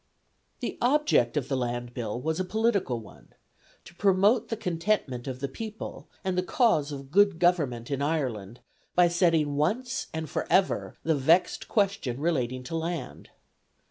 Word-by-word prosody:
The - - -4
object 245 - +3
of 135 -3 -1
the 140 - -1
Land 120 -1 -3
Bill 120 -2 -3
was 160 +5 -2
a - - +1
political 200 - 0
one: 110 - -16 0.5
to - - -13
promote 200 +5 +3
the 225 - -2
contentment 170 - -1
of 130 -1 -5
the 140 - -1
people, 215 +10 -7 0.2
and 190 -2 -1
the 180 - +2
cause 180 - +2
of 140 -1 -8
good 200 -1 +4
government 145 -9 +1
in 140 0 -1
Ireland, 125 -8 -2 0.3
by 180 -1 +6
settling 165 -4 +2
once 240 - -1
and 160 0 -4
for - - -3
ever 190 0 +2
the 160 - +2
vexed 160 +6 +2
question 195 - 0
relating 130 -6 -1
to 145 +6 -5
land. 165 -4 -4
160 Hz, 160 wpm, -27 LUFS, 130-195 Hz, 0.5 s, by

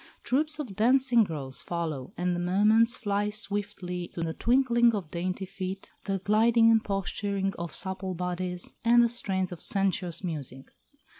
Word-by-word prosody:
Troupes 305 +4 0
of 255 -11 -6
dancing 245 +1 +4
girls 145 -8 -5
follow, 160 -7 -4
and 180 0 0
the - - -2
moments 210 +6 +3
fly 205 -2 -1
swiftly 200 -4 -3
to 170 - -7
the 165 -1 -2
twinkling 240 0 +3
of 180 -7 -5
dainty 185 +2 -3
feet, 190 0 -6
the 195 -1 -1
gliding 225 +4 +4
and 225 -1 +4
posturing 195 0 -2
of 170 -1 -4
supple 190 -1 -1
bodies, 180 0 -3
and 240 +1 +6
the - - +4
strains 190 -6 -2
of 175 - -8
sensuous 190 -3 0
music. 140 -6 -6
195 Hz, 155 wpm, -28 LUFS, 180-225 Hz, -, and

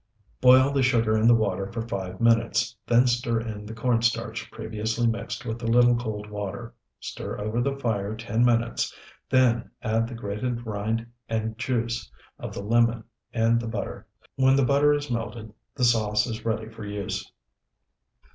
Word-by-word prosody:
Boil 130 +2 +7
the 140 -1 +1
sugar 115 -4 +3
in 110 +1 +3
the 120 - +7
water 100 -3 -1
for 115 - -3
five 95 -4 -4
minutes, 115 +1 +2
then 120 +2 +5
stir 120 -2 +1
in 105 -2 -6
the 110 - -7
corn 115 0 +1
starch 120 -1 -1
previously 110 +2 -2
mixed 115 +1 -2
with 115 0 -4
a 115 - -3
little 120 +1 +5
cold 110 -3 -4
water. 105 +3 -6 0.3
Stir - - -6
over 110 +3 -1
the 135 +2 -1
fire 110 -5 -1
ten 115 +1 0
minutes, 120 -1 +1 0.4
then 125 -3 +3
add 115 +1 +1
the 120 - -7
grated 115 +3 -3
rind 110 +2 -2 0.2
and 110 0 -2
juice 120 - -2 0.3
of - - -6
the 100 - -6
lemon 115 +1 +2 0.3
and 115 0 +2
the 120 - -4
butter. 110 - -5 0.3
When 130 0 +5
the 135 -1 +3
butter 140 +3 +4
is 145 -2 -1
melted, 115 -2 -4 0.2
the 130 - -2
sauce 110 -3 +3
is 115 -2 -6
ready 110 -1 -1
for 110 0 -10
use. 100 -1 -4
115 Hz, 170 wpm, -26 LUFS, 110-120 Hz, 0.4 s, Boil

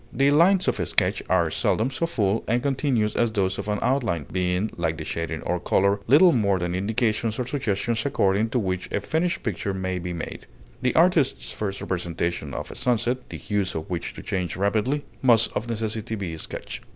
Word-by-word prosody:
The 135 +3 +3
lines 180 +5 +4
of - - +1
a - - -1
sketch - - +1
are 85 -3 +3
seldom 115 +9 +1
so 165 +5 -1
full 105 -8 0
and 120 +2 +1
continuous 130 -6 +1
as 120 -1 +2
those 95 -3 0
of 100 - -5
an 105 0 0
outline, 115 - 0
being, 90 +3 0
like 80 -2 -1
the 80 - -5
shading 85 0 -4
or 90 - -1
color, 100 +3 +2
little 155 +9 +7
more 100 - +2
than 90 0 -2
indications 110 +3 0
or 125 - -1
suggestions 115 -4 -1
according 105 -5 +1
to 125 - -1
which 95 -5 -2
a - - 0
finished 160 - -1
picture 100 -2 -2
may 95 -1 -2
be 90 0 -4
made; 85 -1 -6 0.3
the 125 -1 +1
artist's 150 - +3
first 100 -2 -4
representation 85 -4 -2
of - - -5
a - - -9
sunset, 125 +1 0
the - - -6
hues 100 -2 -2
of 80 +2 -5
which 85 - -3
change 90 -2 -2
so 95 - -7
rapidly, 115 +8 +1 0.2
must 115 -4 +4
of 110 - -2
necessity 110 0 -2
be 95 -6 -4
a 80 - -7
sketch. - - -6
105 Hz, 200 wpm, -25 LUFS, 95-125 Hz, 0.3 s, little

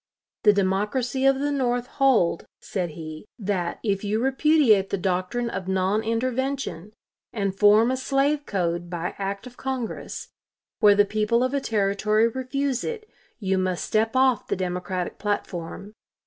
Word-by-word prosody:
The 210 - +6
Democracy 210 +7 0
of 270 0 +4
the 290 +1 0
North 245 -3 0
hold, 250 -12 +2
said 180 -4 -3
he, 155 -1 -7
that 190 -5 -2
"if 200 -3 0
you 210 +2 0
repudiate 265 -6 +3
the 200 - -1
doctrine 185 +6 -1
of 190 -5 -4
non 190 +3 +1
intervention, 235 -3 -2 0.4
and 200 -3 -2
form 210 +4 +5
a 260 - 0
slave 280 +2 0
code 175 -3 -1
by 175 0 -3
act 200 +2 -3
of 245 -1 -12
Congress, 260 -3 -4 0.5
where 210 -2 +6
the 205 0 +5
people 215 +3 +1
of 255 +1 -1
a 280 - 0
Territory 210 0 +2
refuse 260 +2 -2
it, 445 -2 -5 0.3
you 190 -3 0
must 185 -1 -1
step 225 +2 +1
off 260 -3 +3
the - - 0
Democratic 180 0 -3
platform. 205 -1 -4
215 Hz, 150 wpm, -25 LUFS, 190-255 Hz, 0.5 s, The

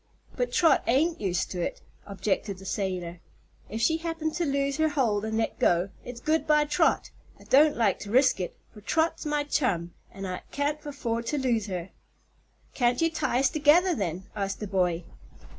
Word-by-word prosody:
"But - - -1
Trot 330 -2 +4
ain't 315 +8 +2
used 185 -3 -1
to 180 - -3
it," - - -3 0.3
objected 200 0 -2
the 190 - -12
sailor. 180 -3 -3 0.5
"If 220 +2 -4
she 320 +7 +3
happened 325 -1 -3
to 345 -2 -1
lose 275 0 0
her 315 0 +2
hold 235 -8 +1
and 220 0 -2
let 225 - -1
go, 175 +2 +3
it's 245 -1 -8
good 315 +4 0
bye 300 -1 +4
Trot. 295 - +1 0.3
I - - -15
don't 295 +3 +4
like 220 -5 +2
to 205 - -8
risk 255 0 +4
it, 180 - -4 0.2
for 210 - -13
Trot's 320 +7 0
my 295 0 0
chum, 175 - -1 0.2
an' 195 0 -7
I 185 -1 -4
can't 290 +1 -1
afford 235 -5 -3
to 295 - 0
lose 240 -6 0
her." 185 -1 -5 0.8
"Can't 245 -1 +1
you 330 0 +2
tie 300 -5 0
us 270 - +3
together, 315 +4 +4
then?" 185 - -3
asked 195 -1 -3
the 210 - -4
boy. 180 -3 0
240 Hz, 190 wpm, -27 LUFS, 195-300 Hz, 0.8 s, Trot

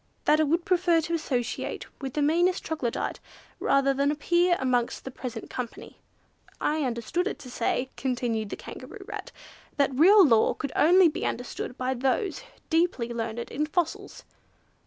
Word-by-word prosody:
That 305 - +4
it 310 - +3
would 335 +4 +1
prefer 355 -2 +3
to 335 +2 -4
associate 255 -7 -2 0.2
with 265 -2 -4
the 300 - +1
meanest 350 +5 +2
Troglodite, 290 -7 -2 0.4
rather 275 0 +3
than 280 +1 +1
appear 345 +4 +2
amongst 250 -2 0
the 265 - -5
present 245 -3 -6
company. 245 -2 -7 0.6
I 305 +1 0
understood 255 - -1
it - - -3
to 250 - -11
say," 250 +2 -1
continued 240 -5 -2
the - - -4
Kangaroo - - -10
Rat, - - -7 0.5
"that 280 -2 +2
real 375 +8 +7
law 230 -6 +4
could 280 -4 -4
only 355 +3 +6
be 310 - -3
understood 245 +1 -4
by 255 +1 -1
those 265 - -1 0.3
deeply 325 -8 +1
learned 230 0 -4
in 300 +3 -1
fossils." 360 +5 -2
280 Hz, 155 wpm, -27 LUFS, 245-335 Hz, 0.6 s, real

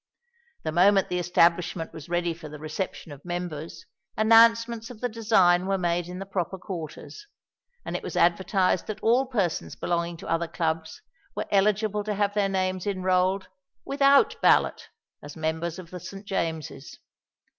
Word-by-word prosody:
The 155 - -2
moment 195 +3 +4
the 180 - -1
establishment 175 -1 +1
was 160 0 -10
ready 175 -1 0
for 160 -2 -10
the 150 - -9
reception 155 +2 -5
of 145 -1 -11
members, 170 -2 -5 0.3
announcements 230 +1 +4
of 245 -4 -11
the 245 - -1
design 195 -6 +3
were 195 0 +1
made 175 -1 -1
in 180 0 -7
the 195 - -6
proper 190 -1 -3
quarters; 185 - -8 0.6
and - - -4
it - - -2
was - - -6
advertised 185 +1 +2
that 215 0 -6
all 250 +4 +3
persons 200 -10 -2
belonging 170 -1 -2
to - - -10
other 165 0 0
Clubs 160 -1 -3 0.3
were - - -2
eligible 210 +1 +2
to 210 -1 -2
have 205 0 0
their 205 -1 +1
names 185 -1 -1
enrolled 185 0 +1 0.4
without 275 0 +3
ballot - - +3 0.3
as 145 +1 -10
members 160 +2 -2
of 180 -3 -10
the 180 - -6
St. 195 +4 -9
James's. 160 -7 -4
180 Hz, 160 wpm, -26 LUFS, 170-205 Hz, 0.6 s, moment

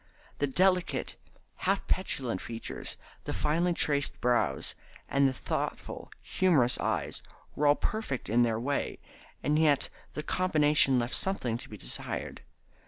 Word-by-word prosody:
The 145 - +2
delicate, 185 +5 +2 0.4
half 195 +1 0
petulant 125 - -1
features, 115 -1 -5 0.3
the - - -2
finely 170 +4 +1
traced 145 -3 +1
brows, 120 - +1 0.3
and 140 0 +4
the - - +2
thoughtful, 130 - -4
humorous 155 -10 +3
eyes - - -1 0.3
were 150 - +2
all 145 - +7
perfect 215 - -2
in 115 +3 +3
their 115 -2 +2
way, 140 +4 -1 0.5
and 150 +1 +2
yet 150 -3 +3 0.3
the 150 - -3
combination 150 -7 +3
left 120 +1 -1
something 160 -12 +1
to - - -11
be - - -8
desired. - - -4
145 Hz, 135 wpm, -30 LUFS, 125-175 Hz, 0.5 s, all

